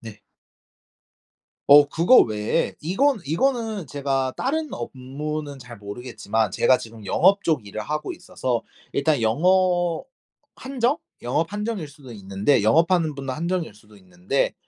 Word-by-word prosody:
네. 110 -2 -11 1.5
어. 145 +1 +9
그거 170 - +5
외에 105 +7 +1
이건 240 - +1
이거는 220 - -1
제가 135 -2 -1
다른 310 +3 -1
업무는 140 +4 -5
잘 125 -2 -11
모르겠지만 110 0 -3
제가 125 +5 +4
지금 110 -1 -11
영업 200 - +4
쪽 150 -10 0
일을 100 +2 -6
하고 150 +7 -3
있어서 120 -3 -3 0.3
일단 140 -1 +1
영업 175 - +2 0.5
한정? 260 +2 -1 0.2
영업 160 +9 -1
한정일 210 -6 -3
수도 140 -4 -13
있는데 100 +4 0
영업하는 165 - +3
분 140 -1 -7
한정일 170 - -2
수도 105 0 -19
있는데 95 +6 -2
145 Hz, 275 characters per minute, -23 LUFS, 115-175 Hz, 1.5 s, 어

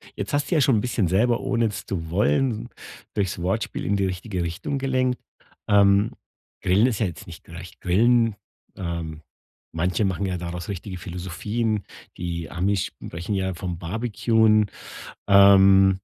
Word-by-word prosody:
Jetzt - - -5
hast 145 +5 0
du - - +3
ja 150 - +4
schon 120 -6 +3
bisschen 115 -7 0
selber, 115 +7 +2
ohne 115 -1 +1
es 105 -1 -4
zu 80 -5 -4
wollen, 105 - +1 0.4
durchs 95 -4 -2
Wortspiel 95 +5 -2
in 100 - +1
die 100 - +1
richtige 90 0 -3
Richtung 100 - -3
gelenkt. 130 -2 0 0.5
Ähm, 100 +1 +4 0.5
Grillen 100 +6 +3
ist 115 -5 -1
ja 110 - +2
jetzt 85 - -9
nicht 85 - -11
gleich 85 +1 -11
Grillen. 115 +4 +3 0.4
Ähm, 85 -3 -5 0.5
manche 90 +5 0
machen 95 +1 -1
ja 90 -1 -2
daraus 85 +1 -6
richtige 95 0 -5
Philosophien. 95 +5 -3 0.3
Die 85 -2 -4
Amis 95 +2 0
sprechen 85 +5 -6
ja 95 -1 -1
vom 85 0 -5
barbecuen. 110 +2 +2 0.6
Ähm 95 -1 +7
100 Hz, 150 wpm, -24 LUFS, 90-110 Hz, 0.6 s, Ähm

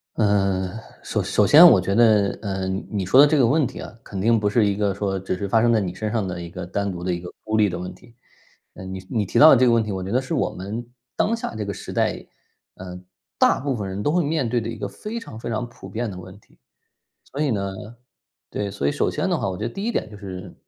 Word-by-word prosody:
呃， 100 -3 +1 0.3
首 - - -2
首 - - +2
先 160 +4 +9
我 120 - +8
觉 95 +2 -1
得， 110 -4 +4
呃， 95 -2 -3
你 95 0 -3
说 125 +8 +5
的 - - +9
这 150 +1 +2
个 125 - +4
问 145 +3 +3
题 - - -7
啊， - - -8
肯 100 - -7
定 115 +4 +3
不 105 -1 0
是 105 0 +3
一 100 - +1
个 100 -1 0
说 95 -1 -2
只 95 -1 -3
是 100 - -3
发 110 +3 +3
生 120 0 +3
在 115 - +3
你 90 -3 -3
身 105 +2 -3
上 110 -5 -1
的 90 -1 -5
一 85 - -7
个 90 0 -7
单 100 +2 -2
独 90 -1 -7
的 90 0 -1
一 85 - -3
个 90 - -9
孤 110 0 -1
立 105 -2 +4
的 90 -1 -5
问 90 0 -6
题。 115 - -19 0.6
呃， 95 - -10
你 95 0 -6
你 110 -3 0
提 - - 0
到 155 - +10
的 - - +8
这 130 +1 +4
个 120 - +4
问 115 -1 +4
题， 110 - -5
我 95 -1 -4
觉 95 - -5
得 130 +2 +2
是 130 +5 -5
我 - - +1
们 105 +6 -6 0.3
当 225 - +1
下 170 - -5
这 110 - -3
个 100 0 -4
时 - - -8
代， - - -1 0.5
呃， 90 -1 -9 0.4
大 - - +4
部 140 -1 -1
分 100 -2 -4
人 95 +2 -4
都 150 - +1
会 175 +1 +2
面 145 -5 -1
对 120 0 +1
的 110 - -5
一 - - -5
个 - - -4
非 215 - -7
常 115 - -8
非 120 - -6
常 115 +2 -2
普 120 - -12
遍 115 -2 -4
的 90 - -8
问 95 +2 -11
题。 - - -28 0.7
所 140 - -7
以 150 - +1
呢 100 -3 -2 0.8
对， 100 -1 -3
所 70 -8 -3
以 - - +2
首 - - 0
先 - - -2
的 - - +1
话， - - -2
我 90 - -4
觉 110 - -3
得 120 - -4
第 195 - -6
一 235 - 0
点 110 - -3
就 105 - -10
是， 95 -2 -8
105 Hz, 305 characters per minute, -23 LUFS, 95-120 Hz, 0.8 s, 到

